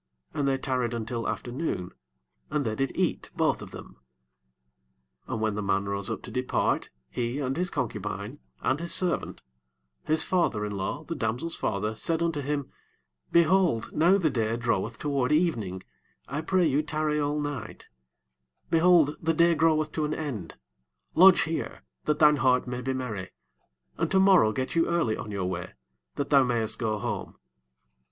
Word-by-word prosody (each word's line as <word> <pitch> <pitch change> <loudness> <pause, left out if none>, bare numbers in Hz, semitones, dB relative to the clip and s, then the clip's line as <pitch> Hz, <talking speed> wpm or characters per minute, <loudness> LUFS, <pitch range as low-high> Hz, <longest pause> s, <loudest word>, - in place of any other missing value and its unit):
And 145 -2 0
they 135 -1 +2
tarried 125 -3 -1
until 115 +1 -3
afternoon, 120 - -3 0.6
and 150 -2 -1
they 110 - -1
did 135 +4 -1
eat - - 0
both - - +1
of - - -8
them. - - -11 1.3
9 - - -4
And 110 - -4
when 110 -1 +1
the 105 - -3
man 100 0 0
rose 100 -1 -1
up - - -4
to - - -8
depart, 125 0 0 0.2
he, 120 +2 -2
and 135 -2 -1
his 180 +2 -1
concubine, 105 - -4 0.2
and 135 +3 +1
his 170 0 -4
servant, 180 -3 0 0.6
his 155 +1 +2
father 145 - +1
in 105 - -4
law, 100 +11 -3
the 165 - -5
damsel's 125 +4 -2
father, 105 +2 -1
said 165 +8 -1
unto 165 -3 -1
him, 145 0 -3 0.6
Behold, 170 -7 +3
now 175 +5 +4
the 165 -6 +1
day 115 -1 0
draweth 115 -5 -1
toward 140 -2 0
evening, 115 - 0 0.4
I 145 +3 -3
pray 180 +2 +2
you 145 -1 +2
tarry 155 -1 -1
all 145 0 0
night: 145 -7 -5 0.9
behold, 165 -3 +5
the 165 0 +1
day 170 +1 +5
groweth 155 -1 +2
to 155 - -1
an 150 - -2
end, 120 - -5 0.6
lodge 185 +1 +7
here, 165 - -3 0.2
that 150 - +1
thine 150 -1 +6
heart 130 -1 +3
may 125 0 -4
be 130 +2 -2
merry; 110 -8 -4 0.7
and - - +1
tomorrow 190 - +5
get 130 +3 -3
you 165 - +3
early 165 -11 +1
on - - -7
your 100 -3 -2
way, 90 0 -4 0.4
that 145 - -3
thou 140 -2 +7
mayest 120 -3 -1
go 110 -2 0
home. 100 - -4
135 Hz, 170 wpm, -27 LUFS, 110-160 Hz, 1.3 s, lodge